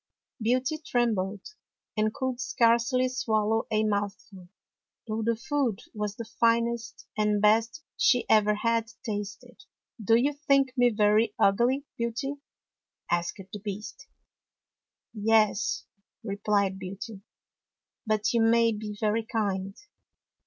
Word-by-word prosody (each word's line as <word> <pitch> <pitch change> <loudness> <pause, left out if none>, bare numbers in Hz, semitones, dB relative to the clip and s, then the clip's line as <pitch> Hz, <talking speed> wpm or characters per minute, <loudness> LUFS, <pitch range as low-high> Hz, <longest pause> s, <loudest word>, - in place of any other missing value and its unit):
Beauty 255 +7 +1
trembled 215 -8 -1 0.5
and 215 0 +1
could 260 +1 -3
scarcely 240 +1 +2
swallow 225 -3 0
a 215 0 +1
mouthful, 200 -3 -3 0.6
though 220 0 -3
the 230 +1 +1
food 265 -3 -1
was 210 -1 -3
the 230 - -6
finest 235 0 +1
and 210 -1 +1
best 225 +7 +2
she 245 -2 +3
ever 210 -1 +4
had 230 +1 0 0.2
tasted. 220 - -6 0.2
" 225 - -15
Do 225 +3 +4
you 270 +5 +2
think 275 -2 +2
me 245 -1 +4
very 210 0 +2
ugly. 245 +8 +2
Beauty? 235 +5 -2 0.4
" - - -19
asked 175 +3 -1
the 210 - -5
Beast. 205 +1 -7 0.6
" - - -65
Yes," 215 -1 +2 0.4
replied 200 -2 0
Beauty. 195 +2 -7 0.4
" - - -65
But 215 +1 +1
you 235 - +3
may 230 0 +4
be 210 -1 -6
very 220 +1 +1
kind." 200 -4 -2
225 Hz, 125 wpm, -27 LUFS, 210-240 Hz, 0.6 s, ever